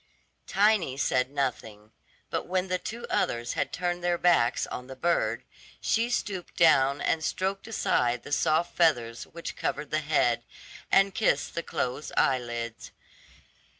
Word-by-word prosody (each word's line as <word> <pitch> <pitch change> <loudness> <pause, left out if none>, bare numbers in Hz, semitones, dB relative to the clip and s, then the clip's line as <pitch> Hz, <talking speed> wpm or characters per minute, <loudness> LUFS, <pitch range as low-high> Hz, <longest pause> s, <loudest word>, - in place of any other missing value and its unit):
Tiny 200 -9 +2
said 130 -2 +1
nothing; 115 -6 -4 0.4
but - - -2
when 185 +1 -1
the 185 0 0
two 230 +5 -6
others 120 0 -1
had - - -1
turned 175 0 -2
their 175 0 +1
backs 170 -10 +3
on 125 - -7
the 135 - -8
bird, 130 -7 0 0.4
she 230 +2 +1
stooped 195 -6 -3
down 140 -4 +5
and 160 - 0
stroked 195 +5 -2
aside 120 - 0
the 145 - -10
soft 160 +3 +1
feathers 120 -9 +2
which 170 0 -7
covered 150 -1 -3
the 155 - +2
head, 145 -6 +2 0.5
and 195 0 +4
kissed 220 - +1
the 170 - -2
closed 130 -2 -3
eyelids. 120 -3 -1
155 Hz, 145 wpm, -28 LUFS, 125-180 Hz, 0.5 s, down